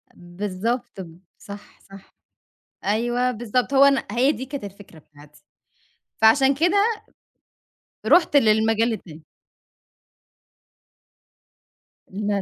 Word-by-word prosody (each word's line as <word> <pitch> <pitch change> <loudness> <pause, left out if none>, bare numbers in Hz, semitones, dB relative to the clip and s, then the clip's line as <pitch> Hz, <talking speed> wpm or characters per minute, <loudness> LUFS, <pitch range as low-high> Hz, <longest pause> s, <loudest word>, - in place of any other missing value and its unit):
بالضبط، 195 +5 -5
ب 165 -1 -13 0.2
صح، 205 0 -13
صح 195 0 -17 0.7
أيوه، 240 +4 0
بالضبط. 240 +3 -2
هو 275 +1 +6
أنا 275 -1 +2
هي 255 +5 +2
دي 260 - -6
كانت 275 -3 -7
الفكرة 195 -4 -12
بتاعتي. 150 0 -20 0.8
فعشان 265 +5 +5
كده 350 +7 +1 1.3
رُحت 335 -4 +3
للمجال 225 -1 +2
التاني. 160 -7 -10 2.8
لا، 205 0 -3
220 Hz, 90 wpm, -22 LUFS, 195-250 Hz, 2.8 s, هو